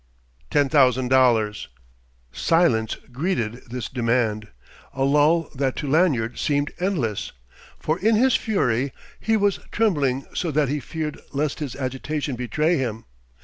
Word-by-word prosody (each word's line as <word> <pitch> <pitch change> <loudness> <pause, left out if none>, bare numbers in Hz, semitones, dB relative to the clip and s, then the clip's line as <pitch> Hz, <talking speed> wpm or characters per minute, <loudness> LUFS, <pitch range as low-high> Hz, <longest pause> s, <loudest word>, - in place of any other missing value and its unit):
"Ten 145 -1 +3
thousand 130 -3 +3
dollars." 120 -5 +3 0.6
Silence 115 - +2 0.2
greeted 125 - -2
this 125 -3 -4
demand, 115 -3 0 0.5
a 135 - 0
lull 150 +4 +3
that 135 -2 -1
to 150 - -4
Lanyard 135 -7 +2
seemed 145 +1 0
endless. 155 - -2 0.4
For 155 +3 -1
in 220 +4 +3
his 255 +3 +4
fury 135 - 0 0.3
he 225 0 +1
was 205 -2 +1
trembling 145 - +1
so 175 - -1
that 150 -2 +1
he 145 +1 -1
feared 155 +3 -5
lest 145 +1 -1
his 145 -5 -4
agitation 140 +2 -3
betray 150 +8 0
him. 115 -4 -3
140 Hz, 135 wpm, -23 LUFS, 125-160 Hz, 0.6 s, his